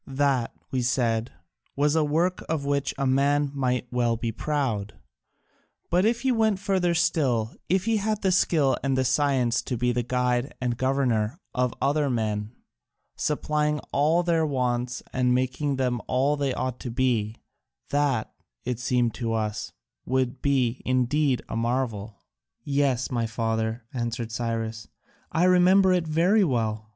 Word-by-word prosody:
That, 135 Hz, -3 st, 0 dB, 0.2 s
we 130 Hz, -, 0 dB
said, 120 Hz, -2 st, 0 dB, 0.4 s
was 145 Hz, +2 st, +2 dB
a 160 Hz, -, +3 dB
work 165 Hz, +5 st, 0 dB
of 155 Hz, -3 st, -1 dB
which 140 Hz, -1 st, 0 dB
a 140 Hz, -, -1 dB
man 140 Hz, +2 st, +2 dB
might 125 Hz, -3 st, 0 dB
well 120 Hz, -2 st, +1 dB
be 115 Hz, 0 st, -2 dB
proud; 120 Hz, -6 st, -2 dB, 1.0 s
but 180 Hz, +3 st, +3 dB
if 235 Hz, +1 st, +1 dB
he 265 Hz, -, +2 dB
went 220 Hz, -4 st, +2 dB
further 185 Hz, -3 st, 0 dB
still, 135 Hz, -10 st, +1 dB, 0.2 s
if 185 Hz, +2 st, +2 dB
he 225 Hz, -1 st, +2 dB
had 215 Hz, 0 st, -1 dB
the 190 Hz, -, +3 dB
skill 150 Hz, -7 st, +3 dB
and 135 Hz, -1 st, +1 dB
the 130 Hz, -, +1 dB
science 130 Hz, -3 st, +2 dB
to 125 Hz, -, -4 dB
be 125 Hz, +1 st, +1 dB
the 120 Hz, 0 st, 0 dB
guide 125 Hz, +1 st, -1 dB
and 125 Hz, -2 st, -1 dB
governor 130 Hz, -2 st, 0 dB, 0.2 s
of 125 Hz, -1 st, +1 dB
other 145 Hz, 0 st, +1 dB
men, 110 Hz, -3 st, -2 dB, 0.6 s
supplying 150 Hz, 0 st, 0 dB
all 155 Hz, +5 st, +2 dB
their 170 Hz, -2 st, +2 dB
wants 125 Hz, -3 st, -1 dB
and 125 Hz, -1 st, +2 dB
making 130 Hz, +3 st, 0 dB
them 125 Hz, -3 st, -1 dB
all 135 Hz, +3 st, +2 dB
they 140 Hz, -2 st, -1 dB
ought 130 Hz, -1 st, -3 dB
to 125 Hz, -, -5 dB
be, 115 Hz, -3 st, 0 dB, 0.6 s
that, 140 Hz, -6 st, 0 dB, 0.3 s
it 125 Hz, -2 st, -2 dB
seemed 125 Hz, -2 st, +1 dB
to 115 Hz, -2 st, -3 dB
us, 110 Hz, -1 st, -2 dB, 0.4 s
would 130 Hz, 0 st, 0 dB
be 130 Hz, -3 st, +1 dB
indeed 130 Hz, +2 st, +1 dB
a -, -, -5 dB
marvel." 115 Hz, -3 st, -2 dB, 0.4 s
"Yes, 140 Hz, -3 st, 0 dB
my 120 Hz, -2 st, 0 dB
father," 110 Hz, 0 st, -2 dB
answered 120 Hz, -2 st, -3 dB
Cyrus, 115 Hz, -1 st, -3 dB, 0.4 s
"I 165 Hz, -, +1 dB
remember 185 Hz, +1 st, +5 dB
it 175 Hz, -3 st, 0 dB
very 175 Hz, +7 st, +3 dB
well. 110 Hz, -, -1 dB
130 Hz, 155 wpm, -26 LUFS, 120-150 Hz, 1.0 s, remember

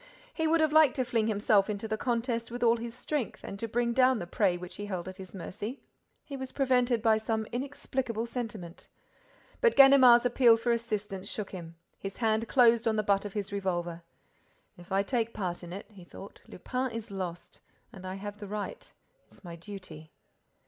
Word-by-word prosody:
He 320 Hz, -1 st, 0 dB
would 325 Hz, +1 st, +3 dB
have 310 Hz, -1 st, +3 dB
liked 310 Hz, -4 st, +6 dB
to 255 Hz, -, 0 dB
fling 230 Hz, -3 st, 0 dB
himself 205 Hz, -1 st, +2 dB
into 210 Hz, +1 st, -3 dB
the 220 Hz, -, -1 dB
contest 235 Hz, 0 st, -1 dB
with 245 Hz, +1 st, -4 dB
all 235 Hz, 0 st, +4 dB
his 235 Hz, 0 st, -7 dB
strength 295 Hz, -7 st, -3 dB
and 200 Hz, -, -7 dB
to 230 Hz, -, -3 dB
bring 235 Hz, +1 st, 0 dB
down 255 Hz, 0 st, +4 dB
the 175 Hz, -, -4 dB
prey 180 Hz, 0 st, +1 dB
which 180 Hz, 0 st, -9 dB
he 205 Hz, -, -5 dB
held 185 Hz, -3 st, -4 dB
at 185 Hz, 0 st, -8 dB
his 190 Hz, 0 st, -10 dB
mercy. 210 Hz, +7 st, -6 dB, 0.5 s
He 280 Hz, -, -7 dB
was 265 Hz, -1 st, -6 dB
prevented 250 Hz, -4 st, +2 dB
by 220 Hz, -2 st, +5 dB
some 220 Hz, 0 st, -2 dB
inexplicable 255 Hz, -3 st, -3 dB
sentiment. 220 Hz, -8 st, -7 dB, 0.7 s
But 470 Hz, -2 st, +4 dB
Ganimard's 265 Hz, -3 st, +8 dB
appeal 240 Hz, -2 st, +5 dB
for 235 Hz, +1 st, 0 dB
assistance 210 Hz, -4 st, -3 dB
shook 210 Hz, -3 st, -5 dB
him. 170 Hz, -3 st, -8 dB, 0.2 s
His 195 Hz, -1 st, -6 dB
hand 225 Hz, -1 st, +1 dB
closed 235 Hz, -3 st, +4 dB
on 220 Hz, -, +2 dB
the 215 Hz, -, +1 dB
butt 200 Hz, 0 st, +1 dB
of 205 Hz, -, -6 dB
his 205 Hz, -1 st, -4 dB
revolver: 175 Hz, -4 st, -2 dB, 0.7 s
"If 175 Hz, -1 st, -15 dB
I 195 Hz, +1 st, +2 dB
take 230 Hz, +1 st, -1 dB
part 180 Hz, -3 st, -3 dB
in 175 Hz, -, -8 dB
it," 195 Hz, +3 st, -7 dB
he 195 Hz, -4 st, -13 dB
thought, 195 Hz, +3 st, -12 dB
"Lupin 255 Hz, +7 st, -3 dB
is 225 Hz, -3 st, -7 dB
lost. 180 Hz, -3 st, -6 dB, 0.3 s
And 190 Hz, -4 st, -11 dB
I 185 Hz, 0 st, -5 dB
have 205 Hz, +1 st, -7 dB
the 205 Hz, -, -7 dB
right—it's 210 Hz, -, -9 dB
my 170 Hz, -2 st, -8 dB
duty." 170 Hz, -4 st, -10 dB
220 Hz, 195 wpm, -29 LUFS, 195-240 Hz, 0.7 s, Ganimard's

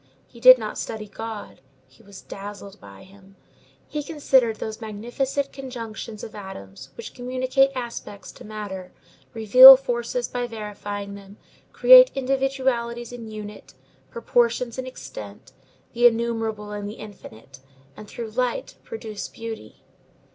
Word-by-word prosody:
He 235 Hz, -, -17 dB
did 255 Hz, +2 st, +9 dB
not 215 Hz, -3 st, -6 dB
study 215 Hz, -1 st, -6 dB
God; 220 Hz, +1 st, -8 dB, 0.3 s
he -, -, -23 dB
was 200 Hz, -3 st, -14 dB
dazzled 200 Hz, 0 st, -10 dB
by 100 Hz, -1 st, -13 dB
him. 195 Hz, 0 st, -19 dB, 0.5 s
He 300 Hz, -, -4 dB
considered 270 Hz, -6 st, +1 dB
those 215 Hz, +1 st, -7 dB
magnificent 240 Hz, +6 st, -3 dB
conjunctions 230 Hz, -5 st, -8 dB
of 220 Hz, -, -8 dB
atoms, 135 Hz, -, -10 dB
which -, -, -8 dB
communicate 255 Hz, +2 st, +1 dB
aspects 235 Hz, -5 st, -7 dB
to -, -, -14 dB
matter, 200 Hz, -4 st, -7 dB, 0.4 s
reveal 255 Hz, +5 st, +10 dB
forces 245 Hz, -1 st, -3 dB
by 245 Hz, -1 st, -3 dB
verifying 205 Hz, -2 st, -6 dB
them, 200 Hz, 0 st, -13 dB, 0.3 s
create -, -, +8 dB
individualities 260 Hz, -3 st, -1 dB
in 235 Hz, -2 st, -8 dB
unity, 210 Hz, -10 st, -10 dB, 0.3 s
proportions 235 Hz, +1 st, 0 dB
in 260 Hz, -, -5 dB
extent, 105 Hz, -, -10 dB, 0.4 s
the 240 Hz, +1 st, +6 dB
innumerable 225 Hz, -2 st, -2 dB
in 205 Hz, -1 st, -5 dB
the 210 Hz, -, -7 dB
infinite, 140 Hz, -, -13 dB, 0.4 s
and, 210 Hz, -, -11 dB
through 225 Hz, +1 st, -7 dB
light, 250 Hz, -, -2 dB
produce 220 Hz, -, -7 dB
beauty. 225 Hz, -1 st, -9 dB
225 Hz, 130 wpm, -23 LUFS, 205-250 Hz, 0.5 s, reveal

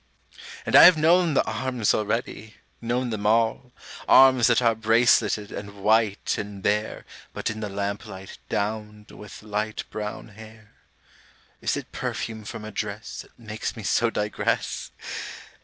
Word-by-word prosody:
And -, -, 0 dB
I -, -, +11 dB
have 180 Hz, -2 st, +8 dB
known 165 Hz, 0 st, +3 dB
the -, -, +3 dB
arms 120 Hz, 0 st, 0 dB
already, 110 Hz, 0 st, -3 dB, 0.3 s
known 120 Hz, +1 st, -1 dB
them 105 Hz, -1 st, -2 dB
all 115 Hz, +3 st, +1 dB, 0.4 s
Arms 130 Hz, -3 st, +7 dB
that 120 Hz, -2 st, +4 dB
are 115 Hz, -2 st, +3 dB
braceleted 110 Hz, -2 st, +2 dB
and 100 Hz, 0 st, -7 dB
white 110 Hz, -1 st, +2 dB
and 100 Hz, -2 st, -7 dB
bare 105 Hz, +1 st, -1 dB, 0.3 s
(But -, -, -2 dB
in 110 Hz, -, -7 dB
the 105 Hz, -1 st, -4 dB
lamplight, 100 Hz, -1 st, -6 dB
downed 105 Hz, 0 st, -4 dB
with 105 Hz, 0 st, -12 dB
light 105 Hz, +1 st, -3 dB
brown 105 Hz, +1 st, -6 dB
hair!) 110 Hz, 0 st, -14 dB, 0.9 s
Is -, -, 0 dB
it -, -, -8 dB
perfume 110 Hz, -2 st, -4 dB
from 105 Hz, +1 st, -7 dB
a 110 Hz, -, -7 dB
dress 105 Hz, +1 st, -5 dB
That -, -, -20 dB
makes 110 Hz, -2 st, -5 dB
me 110 Hz, -, -8 dB
so 115 Hz, +4 st, +2 dB
digress? 105 Hz, -2 st, -2 dB
110 Hz, 145 wpm, -25 LUFS, 105-115 Hz, 0.9 s, I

